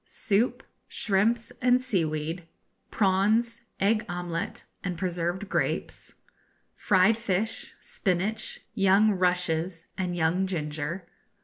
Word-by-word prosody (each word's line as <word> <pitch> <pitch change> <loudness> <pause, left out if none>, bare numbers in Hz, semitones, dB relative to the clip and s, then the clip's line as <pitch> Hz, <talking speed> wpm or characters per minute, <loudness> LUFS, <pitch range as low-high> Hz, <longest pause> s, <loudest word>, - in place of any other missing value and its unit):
Soup. 215 +3 0 0.2
Shrimps 225 +4 +1
and 250 0 +5
Seaweed. 165 -7 -1 0.4
Prawns, 215 +4 +2 0.2
Egg 215 +3 +3
Omelette, 175 -1 -4 0.2
and 180 -2 -3
Preserved 180 +2 -2
Grapes. - - -2 0.6
Fried 205 +1 +4
Fish, 220 -1 -2
Spinach, 200 +4 -2
Young 195 +2 +4
Rushes, 180 -2 0
and 180 -2 -1
Young 175 +3 +2
Ginger. 165 +1 -3
190 Hz, 95 wpm, -27 LUFS, 175-215 Hz, 0.6 s, and